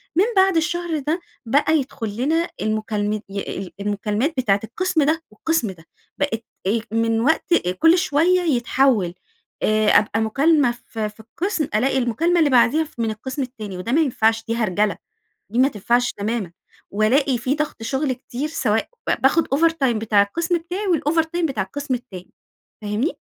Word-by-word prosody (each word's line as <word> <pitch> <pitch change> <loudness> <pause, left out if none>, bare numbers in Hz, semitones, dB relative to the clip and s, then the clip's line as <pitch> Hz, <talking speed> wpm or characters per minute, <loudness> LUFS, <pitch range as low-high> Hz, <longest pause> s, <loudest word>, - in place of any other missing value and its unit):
من 370 - +4
بعد 380 -1 +4
الشهر 345 -1 -1
ده 305 +5 -1 0.3
بقى 290 +6 +3
يدخلنا 270 +5 -1
المكالمت 215 -1 -1
ي 195 -1 -5
المكالمات 210 +7 -1
بتاعة 205 -6 +2
القسم 325 - 0
ده 320 +3 +1
والقسم 235 -2 -1
ده، 165 -2 -15 0.3
بقت 240 -6 -1 0.2
إيه 220 +3 +1
من 225 0 +1
وقت 315 +6 +2 0.3
كل 330 +2 +6
شوية 360 +1 +2
يتحول 245 - +2 0.5
آآ 215 0 +2
أبقى 215 +1 +3
مكالمة 275 +3 +3 0.2
ف 225 - -8
في 210 0 -3
القسم، 305 - -3
ألاقي 265 +5 +2
المكالمة 265 +9 +1
اللي 310 -3 +4
بعديها 255 +5 +4
ف 305 -6 -15
من 225 -1 0
القسم 260 +6 -5
التاني، 215 -7 -6
وده 225 +7 -4
ما 315 +4 +4
ينفعش، 225 -5 +1
دي 230 - -1
هرجلة، 210 -2 0 0.5
دي 240 - 0
ما 265 - +6
تنفعش 240 +2 +1
تمامًا، 210 -3 -3 0.4
وألاقي 245 +6 +2
في 255 +4 -1
ضغط 300 -6 -3
شغل 265 +3 -1
كتير، 255 +3 -5
سواء 225 -9 0 0.3
باخد 295 +5 +3
overtime 325 -2 +2
بتاع 215 -2 +3
القسم 335 - 0
بتاعي 360 +5 -5
والovertime 325 +1 +1
بتاع 255 -10 -1
القسم 280 +7 -4
التاني، 195 -7 -7 0.5
فاهمني؟ 210 - -1
250 Hz, 155 wpm, -21 LUFS, 215-315 Hz, 0.5 s, كل